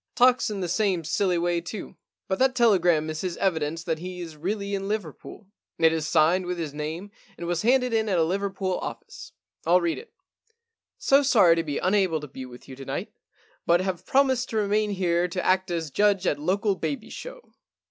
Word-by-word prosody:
Talks 250 -1 +4
in 205 -2 -4
the 180 - -1
same 180 -1 0
silly 180 +3 +1
way 170 0 0
too. 185 +4 -7 0.3
But 190 - -1
that 260 0 +3
telegram 180 -10 +3
is 155 - -5
his 180 -2 -3
evidence 165 -3 -1
that 165 -2 -2
he 180 +1 -7
is 165 -3 -7
really 200 +5 -3
in 195 0 -2
Liverpool. 205 -1 -5 0.3
It 160 -1 +4
is 160 -1 -2
signed 170 +4 +3
with 180 0 -2
his 160 -4 -4
name 160 +7 -5 0.3
and 170 - -6
was 170 -1 -1
handed 250 +1 +2
in 220 -1 +1
at 185 - +1
a 165 - +4
Liverpool 190 +1 -1
office, - - -8 0.3
ril 175 +2 +4
read 170 -2 -1
it. 470 - -14 0.5
" 465 - -60 0.3
So 275 +1 +4
sorry 210 -11 +5
to 165 - 0
be 145 -3 -3
unable 185 -4 +2
to 150 - -8
be 130 -1 -8
with 125 0 -13
you 130 - -9
to 135 - -9
night, - - -4 0.5
but 170 +1 +5
have 185 -2 -3
promised 260 -2 +2
to 220 - -2
remain 210 0 +1
here 180 -3 +1
to 180 +1 -4
act 185 0 +2
as 165 -4 -3
judge 200 +2 +2
at 145 - +1
local 195 +6 +1
baby 155 -5 -4
show." - - -9
180 Hz, 210 wpm, -26 LUFS, 165-205 Hz, 0.5 s, sorry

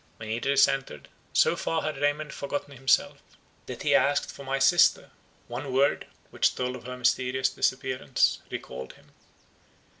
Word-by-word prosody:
When 110 -1 -8
Idris 135 +5 +3
entered, 135 - -4 0.2
so - - +3
far 165 -1 -2
had 155 -3 -3
Raymond 145 +1 0
forgotten 140 0 -5
himself, 135 +1 +1 0.5
that - - -7
he - - +2
asked 140 +2 +2
for 140 - -11
my 135 0 -2
sister; 135 +6 +4 0.4
one 130 +3 -5
word, 135 +2 +1 0.2
which - - +1
told 125 0 -2
of 125 - -11
her 125 0 -6
mysterious 130 +1 +1
disappearance, - - 0
recalled 65 - -7
him. - - -23
135 Hz, 150 wpm, -27 LUFS, 125-140 Hz, 0.5 s, sister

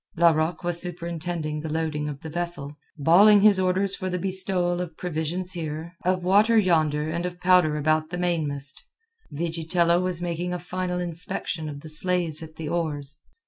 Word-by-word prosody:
Larocque 165 +1 +2
was 175 0 -1
superintending 170 -3 -4
the 155 +1 -5
loading 155 -2 -2
of 140 -2 -7
the 160 - -7
vessel, 170 -4 -4 0.2
bawling 195 +8 +6
his 205 -2 +5
orders 190 +1 +1
for 185 - -4
the 180 - -1
bestowal 185 -1 +2
of 170 -3 -7
provisions 175 +2 -3
here, 160 -1 -5
of 185 0 0
water 210 +5 +4
yonder, 155 -6 +2
and 170 +2 -2
of 175 0 -5
powder 180 -4 +4
about 155 +1 +1
the 180 - -4
mainmast. 150 -5 -1 0.5
Vigitello 170 +2 +1
was 180 -2 -1
making 175 0 -3
a - - -1
final 180 0 -3
inspection 170 -2 -3
of 145 -1 -8
the 155 - -9
slaves 165 0 0
at 160 -1 -10
the 160 - -6
oars. 150 -4 -2
170 Hz, 170 wpm, -25 LUFS, 155-180 Hz, 0.5 s, bawling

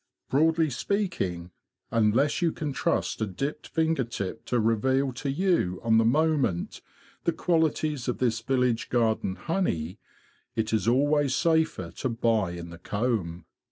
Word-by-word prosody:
Broadly 160 +2 +3
speaking, 120 - -2 0.4
unless 115 +8 +2
you 170 -2 +2
can 150 -3 -4
trust - - -1
a 110 - +1
dipped 135 +10 -4
finger 160 -3 +1
tip 115 -2 -5
to 125 - 0
reveal 130 +5 +1
to 135 +3 -4
you 140 - +1
on 115 -1 +4
the - - +4
moment 140 - +1 0.4
the 170 - +3
qualities 155 -5 0
of 125 - -1
this 115 -3 +1
village 125 -2 0
garden 110 -5 +1
honey, 100 - -2 0.6
it 110 0 -1
is 110 0 +1
always 140 +2 +3
safer 160 - +1
to 130 - -3
buy 115 -6 +1
in 85 -1 -7
the 85 - -10
comb. 100 -4 -2
125 Hz, 145 wpm, -27 LUFS, 110-155 Hz, 0.6 s, on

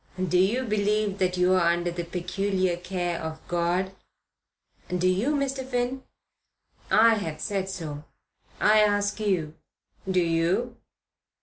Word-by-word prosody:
Do 185 -1 +1
you 220 +8 +2
believe 210 -2 0
that 185 -1 +1
you're 185 +1 +4
under 175 0 +1
the 175 0 -4
peculiar 185 +1 -1
care 175 -1 -3
of 160 0 -5
God?" 175 +2 0 1.0
"Do 180 0 +1
you, 205 +11 +1
Mr. 270 -1 -1
Finn?" 255 0 -2 0.9
"I 225 +1 +6
have 160 -8 -3
said 195 +1 -2
so. 155 -6 -6 0.5
I 215 +1 +5
ask 205 0 +2
you. 180 -8 0 0.6
Do 185 -1 +3
you?" 175 +9 0
185 Hz, 125 wpm, -26 LUFS, 175-210 Hz, 1.0 s, I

